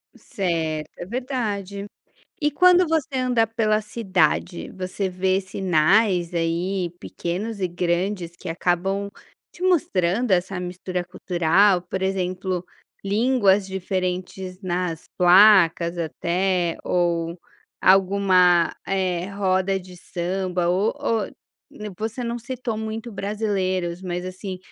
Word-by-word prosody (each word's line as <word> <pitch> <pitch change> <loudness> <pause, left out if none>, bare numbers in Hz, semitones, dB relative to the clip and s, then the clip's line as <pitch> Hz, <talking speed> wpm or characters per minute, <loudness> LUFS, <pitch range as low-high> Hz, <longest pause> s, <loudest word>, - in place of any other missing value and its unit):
Certo, 160 -5 -2
é - - -6
verdade. 205 -4 -3 0.6
E 295 -1 +2
quando 360 +4 +5
você 295 -4 0
anda 250 -3 +2
pela 215 -1 +1
cidade, 185 -5 0
você 190 +1 -3
vê 185 +1 +1
sinais, 185 0 +2
aí, 170 +2 -1
pequenos 200 +5 -4
e 185 - +1
grandes 175 +1 -1
que 185 - -8
acabam 180 +4 0 0.4
te 355 - -12
mostrando 240 - +1
essa 185 0 +1
mistura 180 0 -4
cultural? 180 +2 +2
Por 190 +1 -5
exemplo, 185 -1 -2 0.4
línguas 205 -2 +3
diferentes 185 -1 -3
nas 180 -2 -2
placas 180 -2 +6
até 175 +1 0
ou 170 -1 0 0.4
alguma, 185 -2 +4
eh, 185 -2 -1
roda 195 -1 +1
de 180 -1 -13
samba 180 0 -2
ou 190 +5 +1
ou 230 -7 0 0.5
n 210 0 -7
você 225 +3 -3
não 235 0 -3
citou 240 -1 -4
muito 220 +2 -5
brasileiros 190 -4 -2
mas 180 -1 -3
assim, 185 0 -6
190 Hz, 110 wpm, -23 LUFS, 180-210 Hz, 0.6 s, placas